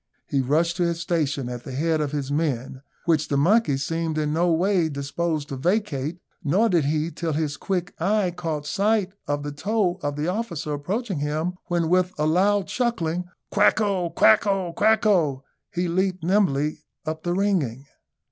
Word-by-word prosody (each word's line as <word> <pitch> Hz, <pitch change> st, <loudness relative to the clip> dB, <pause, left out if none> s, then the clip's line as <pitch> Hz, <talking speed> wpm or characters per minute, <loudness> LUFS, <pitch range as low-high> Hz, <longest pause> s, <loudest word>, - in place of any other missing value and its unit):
He 140 Hz, -, 0 dB
rushed 165 Hz, +6 st, +1 dB
to 180 Hz, -, +2 dB
his 170 Hz, -1 st, 0 dB
station 150 Hz, -7 st, -1 dB
at 125 Hz, -1 st, -6 dB
the 130 Hz, -, -7 dB
head 155 Hz, +3 st, +1 dB
of 145 Hz, -2 st, -1 dB
his 145 Hz, -2 st, -3 dB
men, 135 Hz, -4 st, -1 dB, 0.2 s
which 155 Hz, -3 st, +2 dB
the 140 Hz, -, 0 dB
monkey 175 Hz, 0 st, +3 dB
seemed 165 Hz, +3 st, -2 dB
in 150 Hz, -1 st, 0 dB
no 170 Hz, +2 st, +2 dB
way 175 Hz, 0 st, +2 dB
disposed 145 Hz, +2 st, -2 dB
to 135 Hz, -, -4 dB
vacate, 170 Hz, -2 st, -1 dB, 0.3 s
nor 195 Hz, +10 st, +3 dB
did 170 Hz, -6 st, +2 dB
he 155 Hz, +3 st, 0 dB
till 165 Hz, 0 st, -3 dB
his 150 Hz, -1 st, -1 dB
quick 185 Hz, +2 st, -2 dB
eye 195 Hz, +1 st, +2 dB
caught 160 Hz, -4 st, -4 dB
sight 200 Hz, +3 st, +1 dB
of 145 Hz, 0 st, -1 dB
the 145 Hz, -, -4 dB
toe 185 Hz, +4 st, 0 dB
of 145 Hz, -1 st, -2 dB
the 150 Hz, +2 st, -2 dB
officer 175 Hz, -7 st, -2 dB
approaching 190 Hz, -, -2 dB
him, 155 Hz, +4 st, -1 dB
when, 170 Hz, -2 st, 0 dB
with 185 Hz, +2 st, +2 dB
a 150 Hz, -, +1 dB
loud 190 Hz, +5 st, +3 dB
chuckling 190 Hz, -6 st, -1 dB, 0.3 s
"Quacko! 200 Hz, -3 st, +2 dB
quacko! 180 Hz, -, +3 dB
quacko!" 195 Hz, -, +3 dB, 0.3 s
he 175 Hz, 0 st, -1 dB
leaped 185 Hz, +1 st, 0 dB
nimbly 160 Hz, -6 st, +1 dB, 0.3 s
up 155 Hz, 0 st, -3 dB
the 175 Hz, +1 st, -1 dB
ringing. 165 Hz, -, 0 dB
165 Hz, 170 wpm, -24 LUFS, 145-185 Hz, 0.3 s, monkey